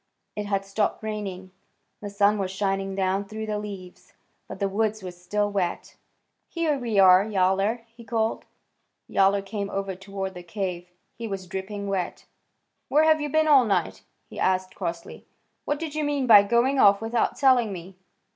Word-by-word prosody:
It 210 -1 -4
had 195 -1 -1
stopped 205 +2 -1
raining; 195 -4 -5 0.5
the 205 - -5
sun 205 +1 +2
was 190 -1 -1
shining 195 0 -2
down 195 +1 0
through 215 +2 -6
the 210 -1 -2
leaves, 195 -4 -9 0.3
but - - -8
the 200 - +1
woods 215 +1 -1
were 180 - -5
still 205 +4 -2
wet. 190 -4 -3 0.5
"Here 330 -3 0
we 230 -4 -2
are, 185 -1 +7
Yowler," 200 +2 +1
he 230 +1 -15
called. 225 -1 -1 0.6
Yowler 195 +1 +2
came 200 0 -4
over 195 -1 -3
toward 195 0 -6
the 180 - -9
cave. 175 -1 -5 0.2
He 230 - -6
was 195 -3 -5
dripping 195 +3 -5
wet. 195 -2 -3 0.6
"Where 300 +2 +4
have 315 -1 +4
you 295 - -2
been 315 +2 +2
all 280 -4 +7
night?" 195 -7 -1 0.3
he - - -10
asked 185 0 0
crossly. 170 0 -6 0.4
"What 290 - -1
did 320 -3 -5
you 305 0 -2
mean 290 -2 0
by 215 -4 +9
going 240 +6 +2
off 200 -3 +6
without 225 +1 -1
telling 255 -6 +4
me? 185 0 -8
200 Hz, 175 wpm, -25 LUFS, 190-225 Hz, 0.6 s, by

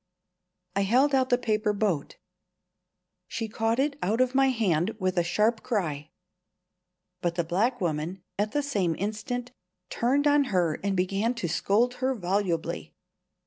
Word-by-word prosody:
I 200 - +2
held 255 +8 +3
out 260 -1 +3
the 245 - +4
paper 215 -3 0
boat. 200 -8 -1 1.1
She 225 -1 -3
caught 225 +1 0
it 280 +2 0
out 215 +6 0
of 255 0 +2
my 270 0 +4
hand 210 -6 +1
with 185 -2 -1
a 175 - +3
sharp 215 +6 +1
cry. 155 - -2 1.1
But 170 -1 -1
the 170 - +1
black 205 +10 0
woman, 170 +1 -2 0.2
at 210 +1 +1
the 290 - 0
same 195 - 0
instant, 220 +5 -3 0.4
turned 270 +5 +1
on 290 -1 +4
her 180 -9 0
and 200 -1 0
began 195 +6 0
to 230 -7 -2
scold 220 +9 +2
her 260 +1 +1
volubly. 185 -4 -2
215 Hz, 150 wpm, -27 LUFS, 180-245 Hz, 1.1 s, the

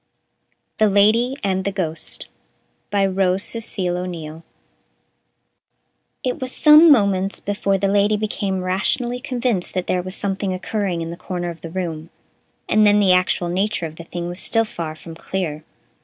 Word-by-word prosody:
The 215 -1 +4
Lady 220 +6 +3
and 190 -1 0
the 200 - -1
Ghost 165 -5 -3 0.6
BY 200 -1 +2
ROSE 190 0 +1
CECIL 190 -6 -2
O'NEILL 165 -3 -6 1.8
It 255 0 -2
was 255 -1 -2
some 305 +3 +7
moments 200 -6 +2
before 200 -1 -1
the 195 +1 0
Lady 205 +1 +2
became 200 -3 -2
rationally 240 +7 0
convinced 245 -7 -2
that 185 -1 -1
there 180 - 0
was 185 +1 -7
something 195 -1 -2
occurring 185 -2 -2
in 165 0 -4
the 170 - -7
corner 175 -1 -4
of 165 - -12
the 165 - -7
room, 165 -3 -4 0.6
and 215 - +4
then 205 0 +5
the 195 -3 +4
actual 180 -1 +1
nature 195 0 -1
of 160 0 -8
the 170 - -8
thing 175 +1 -5
was 175 +2 -5
still 225 0 +2
far 165 -6 -6
from 165 +1 -11
clear. 160 -2 -4
190 Hz, 160 wpm, -21 LUFS, 175-210 Hz, 1.8 s, some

